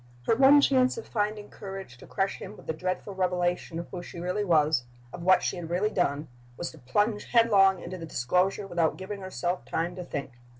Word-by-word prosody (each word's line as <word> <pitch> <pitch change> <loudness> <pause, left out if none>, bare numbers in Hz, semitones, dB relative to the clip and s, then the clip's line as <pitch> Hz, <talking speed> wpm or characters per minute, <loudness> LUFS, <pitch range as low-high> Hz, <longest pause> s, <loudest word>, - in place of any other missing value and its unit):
Her 225 - +3
one 275 +3 +7
chance 260 - +3
of 460 - -6
finding 210 -1 -2
courage 195 -9 -8
to - - -13
crush 195 0 -1
him 205 +2 -8
with - - -14
the 160 - -2
dreadful 185 +4 -3
revelation 180 -2 -1
of 170 - -5
who 180 - -5
she 175 - -9
really 180 +4 -1
was, 155 -7 +3 0.3
of 180 - -7
what 185 +2 +4
she - - -1
had 170 -2 -6
really 190 +5 +1
done, 150 -6 0 0.3
was 175 - -4
to 160 - -15
plunge 205 - 0
headlong 200 -5 +5
into 185 - -6
the 165 - -7
disclosure 180 +10 +1
without 175 -4 0
giving 195 +1 -6
herself 185 -1 -3
time 170 +2 -2
to 180 - -4
think. 140 -5 -5
185 Hz, 210 wpm, -28 LUFS, 170-205 Hz, 0.3 s, one